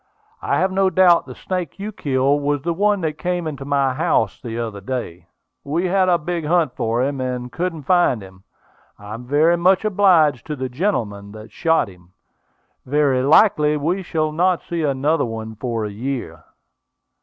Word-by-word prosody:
I - - 0
have 190 0 +1
no 190 0 +2
doubt 185 -2 +4
the - - -9
snake 180 -2 -4
you 205 +2 -5
killed 140 -4 0
was 145 -1 -1
the 170 +1 0
one 205 +2 +1
that 155 -2 -3
came 180 -1 -2
into 140 -3 -5
my 140 -2 +1
house 110 -6 0
the 115 -1 -6
other 110 -4 -4
day. 95 -7 -5 0.4
We 160 +6 -1
had 185 0 +2
a 175 - +4
big 170 +1 -4
hunt 160 -3 +1
for 115 +2 0
him, 135 0 -2
and 125 -1 -4
couldn't 170 -3 -3
find 175 - +2
him; 95 0 -14 0.6
and 105 - -13
I 105 - -6
am 120 +3 -8
very 155 +5 +3
much 185 +4 +3
obliged 180 - +3
to 150 - -3
the 130 -2 -4
gentleman 110 - -2
that 110 0 -11
shot 165 -6 +1
him. 90 -2 -17 0.7
Very 140 -1 +1
likely 150 +1 +4
we 170 +6 -1
shall 155 -3 -1
not 180 +3 +1
see 170 -1 -3
another 145 +2 +1
one 110 -1 -5
for 115 0 -3
a 105 - -5
year." 105 - -5
145 Hz, 185 wpm, -20 LUFS, 120-175 Hz, 0.7 s, doubt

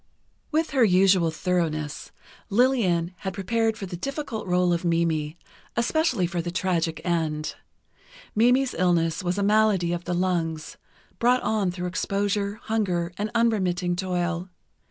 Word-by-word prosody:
With 320 +1 0
her 265 -3 +3
usual 185 -3 +4
thoroughness, 160 -3 -2 0.4
Lillian 200 -7 +2
had 190 0 -5
prepared 225 +3 0
for 200 - -5
the 180 -1 -6
difficult 275 - -4
rôle 180 0 +2
of 170 - -1
Mimi, 165 -2 0 0.4
especially 245 - +1
for 175 0 -2
the 175 - -4
tragic 170 -3 -1
end. 160 -3 -1 0.8
Mimi's 245 +4 +3
illness 170 -2 +1
was 180 +1 -1
a 200 - +1
malady 205 -4 +3
of 175 0 -4
the 175 - -1
lungs, 170 -3 -1 0.4
brought 250 +2 +3
on 210 -4 +1
through 180 0 -4
exposure, 200 +2 -1
hunger 185 -6 -1
and 210 +1 -1
unremitting 185 -6 +1
toil. 180 -1 -2
180 Hz, 135 wpm, -25 LUFS, 170-215 Hz, 0.8 s, usual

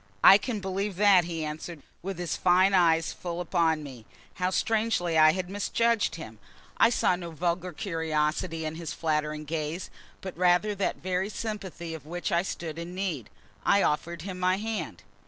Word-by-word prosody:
"I 195 - +9
can 225 0 -3
believe 195 +1 -2
that," 195 -2 +5
he 165 -2 -3
answered, 155 0 -7 0.2
with 190 0 -5
his 175 -1 -2
fine 185 +2 +4
eyes 165 -3 +3
full 175 -1 -5
upon 165 -3 +1
me. 125 -7 -10 0.3
How 180 - +2
strangely 215 -4 0
I 155 0 +7
had 185 -1 -3
misjudged 215 +3 +1
him! 110 -10 -9 0.4
I 230 - +6
saw 225 -5 +2
no 175 -1 -7
vulgar 175 +2 -2
curiosity 160 -1 -1
in 155 +1 -4
his 165 -1 -5
flattering 150 -1 -1
gaze, 155 +3 -4 0.3
but 190 -2 -7
rather 180 +4 +3
that 200 -1 -1
very 185 +1 -1
sympathy 195 -7 -5
of 155 -2 -9
which 175 +4 -3
I 170 -1 +3
stood 165 -3 -5
in 170 +2 -7
need. 170 - -3 0.3
I 200 - +4
offered 165 +2 -1
him 185 -1 -6
my 185 +1 +2
hand. 220 +1 -4
175 Hz, 175 wpm, -28 LUFS, 160-190 Hz, 0.4 s, I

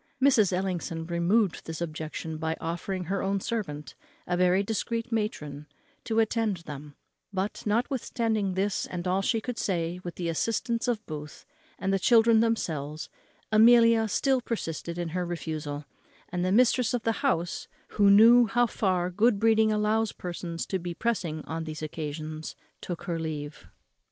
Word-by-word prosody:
Mrs. 250 -8 +4
Ellison 180 -3 -2
removed 175 +3 +1
this 160 -1 -5
objection 160 -1 -5
by 160 0 -2
offering 175 +3 -3
her 190 +3 -2
own 195 0 0
servant, 185 -10 -4 0.3
a 180 - 0
very 180 +2 +3
discreet 230 +3 -2
matron, 150 -10 -3 0.4
to 225 -2 -1
attend 225 -2 +1
them; 145 0 -8 0.4
but 195 +1 -2
notwithstanding 225 -3 0
this, 195 +1 0
and 180 0 -4
all 185 +2 +2
she 225 +3 +1
could 245 +1 -5
say, 175 -2 -1
with 175 - -6
the 175 - -3
assistance 230 +8 -1
of 225 -3 -1
Booth, 150 -1 -8 0.3
and 195 0 -1
of 195 - +2
the - - -14
children 230 -1 +6
themselves, 160 -10 -1 0.4
Amelia 230 0 +6
still 265 +4 +1
persisted 170 -7 -4
in 175 -1 -2
her 180 +2 -2
refusal; 155 -4 -4 0.4
and 180 -1 -2
the 185 - +1
mistress 245 +2 +3
of 235 - -3
the 225 - +2
house, 170 +2 0 0.2
who 200 -1 +4
knew 230 +4 +8
how 240 +4 +3
far 185 -5 0
good 210 +3 +3
breeding 220 0 +4
allows 215 +1 +1
persons 170 -2 -5
to 190 - -2
be 175 0 -5
pressing 170 -9 -2
on 160 +1 -4
these 155 0 -6
occasions, 155 0 -5 0.3
took 175 -2 -5
her 170 -2 -2
leave. 150 -2 -5
185 Hz, 160 wpm, -28 LUFS, 165-225 Hz, 0.4 s, knew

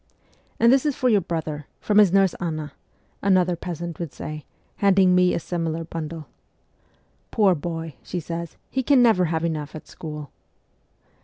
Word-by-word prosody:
'And 235 +2 +6
this 270 - +4
is 295 -3 0
for 255 - +1
your 210 -4 +4
brother, 155 -4 -4
from 210 0 +3
his 205 -4 +6
nurse 195 -2 +4
Anna,' 155 -4 -4 0.5
another 185 -2 +3
peasant 170 -1 -6
would 170 -5 -4
say, 155 -1 -7 0.3
handing 195 -2 +4
me 180 0 +4
a - - 0
similar 165 -1 -3
bundle. 160 -1 -6 0.4
' - - -39
" - - -39 0.2
Poor 205 -4 +4
boy," 165 0 -4
she 180 - -4
says, 170 0 -6
" - - -43
he 265 - 0
can 265 -1 +4
never 220 -6 +4
have 165 0 -1
enough 155 -3 -3
at 155 - -9
school." 150 -3 -8
170 Hz, 175 wpm, -24 LUFS, 160-195 Hz, 0.5 s, And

